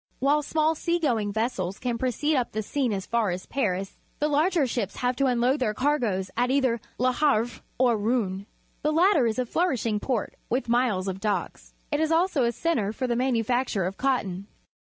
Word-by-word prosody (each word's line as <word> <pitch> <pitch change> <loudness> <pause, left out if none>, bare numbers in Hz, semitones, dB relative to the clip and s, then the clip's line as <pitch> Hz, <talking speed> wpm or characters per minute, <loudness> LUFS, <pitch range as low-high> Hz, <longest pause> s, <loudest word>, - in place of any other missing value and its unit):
^Miile 290 +3 +2
small 315 +2 +1
sea 340 +2 0
going 230 -11 0
vessels 200 -4 -2
can 240 -2 -2
proceed 260 +5 0
up 250 -3 -1
the 215 0 -2
Seine 250 -1 -1
as 190 - -4
far 230 -3 +1
as 180 +1 -4
Paris, 195 -7 -2 0.2
the 300 - +1
larger 305 +1 +2
ships 225 -5 -2
have 250 0 0
to 275 - +2
unload 250 +3 +2
their 215 -5 0
cargoes 235 -9 0
at 245 +2 +1
either 260 -4 +1 0.2
Le 255 +1 +2
Havre 245 -5 +1 0.2
or 245 -2 +3
Rouen. 205 -3 -1 0.3
The 305 - +1
latter 325 - +4
is 220 - -1
a 255 - 0
flourishing 240 -8 0
port, 235 -2 -2 0.2
with 250 +2 -1
miles 235 -6 +1
of 190 0 -3
docks. 205 0 -3 0.2
It 295 - +1
is 315 0 +1
also 325 -5 +2
a 235 - +2
centre 235 -6 0
for 255 +4 -3
the 240 -1 0
manufacture 245 -3 +1
of 190 +2 -4
cotton. 205 -8 -1
245 Hz, 195 wpm, -26 LUFS, 215-280 Hz, 0.3 s, latter